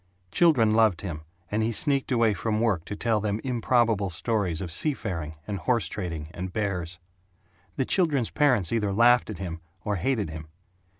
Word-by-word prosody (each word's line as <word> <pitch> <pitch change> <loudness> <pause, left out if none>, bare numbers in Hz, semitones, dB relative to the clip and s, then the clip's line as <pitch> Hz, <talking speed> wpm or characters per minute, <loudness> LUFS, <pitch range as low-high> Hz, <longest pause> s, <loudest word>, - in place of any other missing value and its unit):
Children 135 - +4
loved 110 -5 +3
him, 85 -6 -5 0.3
and 105 +2 0
he 110 +1 +1
sneaked 140 +4 +1
away 115 -3 +3
from 105 +3 -1
work 105 -8 +1
to 105 - -5
tell 115 0 +1
them 105 0 -1
improbable 115 -5 +1
stories 95 -2 -1
of 90 -3 -5
sea 145 - +2
faring 80 - -5
and 100 0 -4
horse 115 -1 +1
trading 85 -5 -5
and 90 +1 -5
bears. 90 -5 -3 0.8
The 130 - 0
children's 145 - +1
parents 125 - +2
either 105 -3 0
laughed 120 +4 +4
at 105 - -5
him 85 -2 -6 0.2
or 105 -1 0
hated 105 -3 -1
him. 80 0 -8
105 Hz, 175 wpm, -26 LUFS, 90-120 Hz, 0.8 s, Children